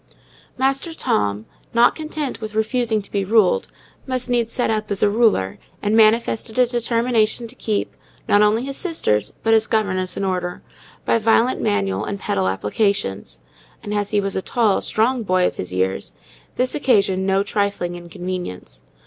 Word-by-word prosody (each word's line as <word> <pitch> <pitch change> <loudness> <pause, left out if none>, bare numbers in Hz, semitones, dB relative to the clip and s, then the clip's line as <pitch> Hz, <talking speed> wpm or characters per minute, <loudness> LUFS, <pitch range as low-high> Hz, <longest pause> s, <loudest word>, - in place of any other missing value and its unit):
Master 270 +5 0
Tom, 105 - 0 0.3
not 235 +1 +5
content 305 -5 -4
with 215 -1 -6
refusing 220 -1 0
to - - -11
be 200 -1 0
ruled, 230 - +3 0.4
must 255 -1 -2
needs 235 -2 +1
set 245 -2 0
up 215 -1 -2
as 200 -1 -1
a 205 - +4
ruler, 210 - +2 0.2
and 210 +1 0
manifested 225 +1 +2
a 250 - +6
determination 235 -1 +1
to 230 - -6
keep, 215 -5 -2 0.3
not 205 - +4
only 210 +3 +3
his 275 0 -4
sisters, 210 - 0
but 225 - +3
his 220 -1 +4
governess 185 -4 -1
in - - -2
order, 180 -2 -3 0.4
by 230 - +2
violent 225 +3 +2
manual 95 -1 0
and 200 - -4
pedal 95 - -1
applications; 95 - -1 0.4
and, 205 - -4
as 205 -1 -1
he 210 - +1
was 195 -1 -2
a 190 - 0
tall, 220 -1 +1
strong 235 +3 +1
boy 185 -3 +2
of - - -1
his 90 - -5
years, 95 +1 -1 0.4
this 255 +1 0
occasioned 195 -9 +2
no 195 +1 +2
trifling 200 -4 -1
inconvenience. 175 - -6
210 Hz, 165 wpm, -21 LUFS, 185-235 Hz, 0.4 s, a